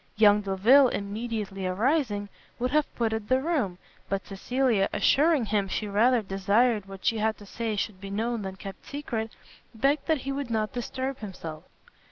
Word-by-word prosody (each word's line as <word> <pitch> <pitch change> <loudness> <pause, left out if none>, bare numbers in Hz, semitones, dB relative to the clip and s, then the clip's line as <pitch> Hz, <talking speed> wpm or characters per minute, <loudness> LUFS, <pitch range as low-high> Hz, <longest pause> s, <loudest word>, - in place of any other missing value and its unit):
Young 210 -1 +6
Delvile, 210 +8 +5
immediately 205 -3 -3
arising, 210 - 0 0.3
would 250 +1 -1
have 300 0 +3
quitted 220 -2 -1
the 255 0 +4
room; 265 - -1 0.3
but 195 0 -2
Cecilia, 225 +1 +1
assuring 300 -3 +3
him 205 -2 0
she 210 +2 -2
rather 225 +4 +3
desired 200 +3 +2
what 195 -1 -10
she 225 - +2
had 220 +1 +1
to 205 - -13
say 225 +2 -3
should 200 -2 -3
be 195 - -7
known 225 +3 -1
than 190 -1 -5
kept 195 0 -9
secret, 230 -6 -4 0.4
begged 275 +6 +1
that 315 -5 +2
he 275 - -3
would 275 -2 -3
not 215 -2 -1
disturb 260 +2 -3
himself. 165 -7 -7
220 Hz, 170 wpm, -27 LUFS, 200-255 Hz, 0.4 s, Young